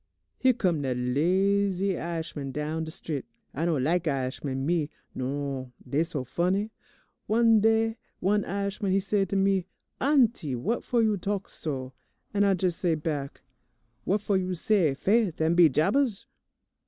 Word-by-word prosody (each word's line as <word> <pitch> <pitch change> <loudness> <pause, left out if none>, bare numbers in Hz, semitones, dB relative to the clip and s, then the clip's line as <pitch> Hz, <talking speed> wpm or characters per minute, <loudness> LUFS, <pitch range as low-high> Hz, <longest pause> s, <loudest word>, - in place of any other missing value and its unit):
"Here 260 -1 +4
come 180 -10 0
dat 130 -3 -1
lazy 190 +8 +1
I'ishman 160 -5 -4
down 155 +3 -3
de - - -7
strit. 155 -4 -4 0.3
I 160 +5 -1
don't 155 -7 +1
lak' 170 +3 +1
I'ishman, 135 -1 -2
me, 160 -2 +1 0.2
non, 135 -1 -4
dey 145 +3 +1
so 155 -5 -4
funny. 185 - 0 0.6
One 225 0 +5
day 225 +1 +2 0.2
one 205 +2 +2
I'ishman, 200 +1 -2
he 195 - +4
say 195 0 +1
to 195 - -4
me, 195 -2 +2 0.3
'Auntie, 240 - +2
what 205 - -1
fo' 240 -2 +1
you 215 -2 +2
talk 195 +1 -3
so?' 130 -4 -5 0.4
and 205 0 +3
I 195 - +4
jes' 180 -2 0
say 170 -3 +1
back, 150 -3 -4 0.6
'What 200 +2 +1
fo' 205 - 0
you 185 -1 0
say 170 -5 +2
"Faith 200 +1 +1
an' 160 +1 +2
be 170 -2 +7
jabers"?' 200 - +1
175 Hz, 155 wpm, -27 LUFS, 150-200 Hz, 0.6 s, be